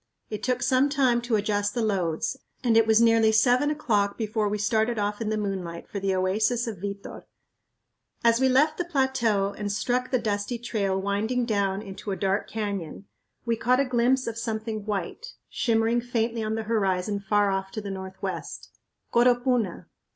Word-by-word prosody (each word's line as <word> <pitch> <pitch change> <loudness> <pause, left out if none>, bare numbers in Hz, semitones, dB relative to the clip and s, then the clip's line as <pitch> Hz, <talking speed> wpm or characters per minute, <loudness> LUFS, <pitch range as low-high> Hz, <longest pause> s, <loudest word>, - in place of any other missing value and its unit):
It 210 -1 -4
took 250 +3 0
some 260 +2 +3
time 260 -5 +2
to 240 -1 0
adjust 205 -1 0
the 240 - 0
loads, 190 +2 -1 0.3
and 235 -3 +3
it 225 0 +5
was 220 0 +5
nearly 225 -1 +5
seven 250 +6 +3
o'clock 210 -10 0
before 215 -1 -1
we 210 - -1
started 220 +2 +1
off 205 +1 -2
in 215 - -1
the 215 - 0
moonlight 190 -5 -4
for 200 - -5
the 195 -1 0
oasis 215 +6 +1
of 220 -6 -5
Vitor. 200 +1 -6 1.0
As 230 0 +4
we 265 0 +3
left 300 +5 +3
the - - +1
plateau 255 - +1
and 205 -1 -3
struck 250 +4 -1
the 255 - +2
dusty 210 +1 -2
trail 205 -5 -1
winding 215 +5 0
down 200 -2 0
into 195 0 -8
a 195 - -1
dark 195 +1 -1
canyon 200 -4 -4 0.4
we 235 -1 +1
caught 250 +3 +2
a 275 - +3
glimpse 255 +1 +2
of 230 0 -4
something 220 -2 -4
white 210 - -4 0.2
shimmering 230 0 +1
faintly 230 -1 -1
on 215 0 -1
the 225 - -2
horizon 200 -2 0
far 205 0 +2
off 195 0 -2
to - - -3
the 200 -2 -5
northwest; 190 0 -6 0.4
Coropuna! 245 -4 +2
220 Hz, 180 wpm, -26 LUFS, 200-240 Hz, 1.0 s, it